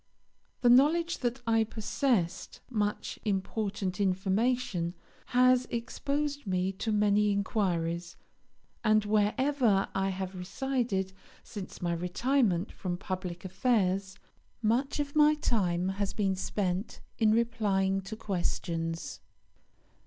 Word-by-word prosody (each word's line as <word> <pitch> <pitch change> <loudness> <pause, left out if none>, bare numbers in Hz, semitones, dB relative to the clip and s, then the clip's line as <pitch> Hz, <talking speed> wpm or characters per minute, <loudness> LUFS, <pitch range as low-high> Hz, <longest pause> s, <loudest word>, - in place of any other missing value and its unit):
The 245 - +5
knowledge 325 +7 +4
that 245 0 -2
I 225 -1 +3
possessed 220 -3 -1
much 210 -3 -2
important 200 -1 -2
information 190 -1 0 0.3
has 255 0 +4
exposed 285 +4 -2
me 185 0 0
to 205 +3 -3
many 210 0 +3
inquiries, 175 -4 -1 0.7
and 215 -1 +3
wherever 215 +1 +2
I 195 0 0
have 190 0 -4
resided 195 0 -2 0.3
since 200 -4 -8
my 170 -1 +1
retirement 185 +2 +1
from 175 -2 -4
public 185 -1 -5
affairs 190 -2 0 0.5
much 245 +7 +1
of 285 0 -3
my 300 0 +6
time 185 -11 0
has 195 0 -2
been 195 -3 0
spent 190 +1 -2 0.2
in 220 -2 +4
replying 205 -4 +1
to 195 +3 -7
questions. 170 -5 -3
205 Hz, 110 wpm, -30 LUFS, 185-240 Hz, 0.7 s, my